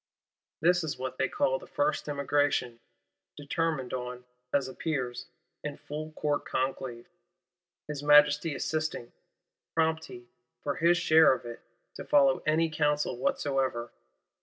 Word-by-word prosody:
This 180 +2 +3
is 155 -4 -3
what 130 0 -5
they 135 - +1
call 130 0 +1
the - - -13
First 145 - -1
Emigration; 140 -4 0 0.6
determined 145 -2 -2
on, 125 0 -5 0.3
as 140 -2 +1
appears, 130 -3 -3 0.4
in 145 -1 -5
full 155 +1 -7
Court 150 -1 -1
conclave; 130 -2 -3 0.8
his 150 -2 -5
Majesty 150 +1 +5
assisting; 155 -6 -3 0.6
prompt 160 -1 +1
he, 120 0 -11 0.4
for 145 - -2
his 170 +1 +4
share 160 -3 +6
of 125 - -6
it, 120 0 -7 0.4
to - - -6
follow 140 -2 +4
any 160 +2 +3
counsel 150 -3 0
whatsoever. 130 -2 -1
145 Hz, 130 wpm, -29 LUFS, 130-155 Hz, 0.8 s, share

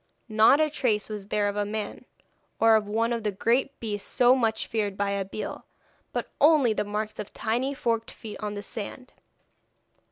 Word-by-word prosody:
Not 220 +6 +6
a 310 - +4
trace 240 -8 0
was 210 -2 -6
there 205 0 +1
of 200 - -2
a 205 - +1
man, 210 0 -5 0.5
or 225 0 +6
of 215 -1 +1
one 230 +3 +1
of 230 - -2
the 210 - 0
great 240 +7 0
beasts 210 -3 -4
so 250 +1 +5
much 225 -3 0
feared 205 -4 -2
by 200 0 0
Abeille, 200 +1 -4 0.5
but - - -3
only 290 -7 +5
the - - 0
marks 210 +1 -4
of 210 - -6
tiny 250 +5 -1
forked 230 -4 -1
feet 215 -2 -9
on 210 -1 -4
the 205 - -5
sand. 240 +4 -7
220 Hz, 185 wpm, -27 LUFS, 205-240 Hz, 0.5 s, Not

